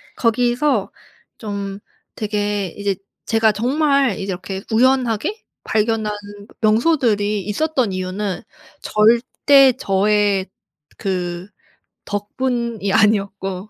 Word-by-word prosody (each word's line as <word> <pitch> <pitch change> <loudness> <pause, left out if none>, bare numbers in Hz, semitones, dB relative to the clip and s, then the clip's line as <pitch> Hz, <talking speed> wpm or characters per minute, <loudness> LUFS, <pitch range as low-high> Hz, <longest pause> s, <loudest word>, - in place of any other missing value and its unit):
거기서 240 0 +1 0.5
좀 200 -2 -5 0.4
되게 205 -2 -1
이제 200 -1 -1 0.3
제가 225 -1 +3
정말 275 +2 +2
이제 - - -4
이렇게 190 +1 -5
우연하게 255 - +1 0.2
발견한 215 -1 0 0.5
명소들이 215 -3 +2
있었던 255 0 0
이유는 185 +1 -3 0.4
절대 250 +5 +4
저의 200 -1 +1 0.5
그 180 -2 -3 0.6
덕분이 225 0 -2
아니었고 200 -2 +1
210 Hz, 200 characters per minute, -20 LUFS, 200-240 Hz, 0.6 s, 절대